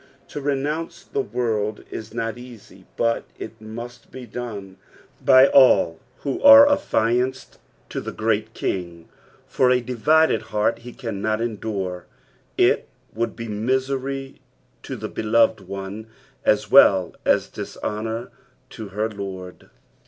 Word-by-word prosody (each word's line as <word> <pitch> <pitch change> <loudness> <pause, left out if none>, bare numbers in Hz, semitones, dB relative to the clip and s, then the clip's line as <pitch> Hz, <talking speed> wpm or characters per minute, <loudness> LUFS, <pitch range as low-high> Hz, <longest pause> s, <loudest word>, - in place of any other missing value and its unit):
To 145 - -6
renounce 150 +5 -2
the 140 - -2
world 110 -3 -2
is 110 -1 -7
not 115 0 -3
easy, 110 -6 -14
but 115 0 +1
it 115 - -9
must 120 +2 -9
bo 130 -1 -9
done 105 -5 -7 0.5
by 130 0 +7
all 130 -12 +5 0.2
who 140 - -3
are 280 0 +10
affianced 125 - 0 0.3
to - - -4
the - - -6
Great 110 0 -1
King, 85 -3 -4 0.4
for 130 - +2
a 125 0 +4
divided 150 +7 +2
heart 105 +1 -1
he 120 +1 -10
cannot 110 -2 -3
endure; 100 -6 -4 0.5
it - - +3 0.3
would 115 0 -2
be 115 0 -6
misery 130 +4 -2 0.4
to - - -6
the - - -5
beloved 110 -3 +1
one 100 +3 -7 0.4
as 105 0 +2
well 95 -9 +6
as - - +2
dishonour 110 +3 -5 0.4
to 110 - -8
her 105 +3 -2
Lord. 95 -4 -8
115 Hz, 130 wpm, -22 LUFS, 105-130 Hz, 0.5 s, are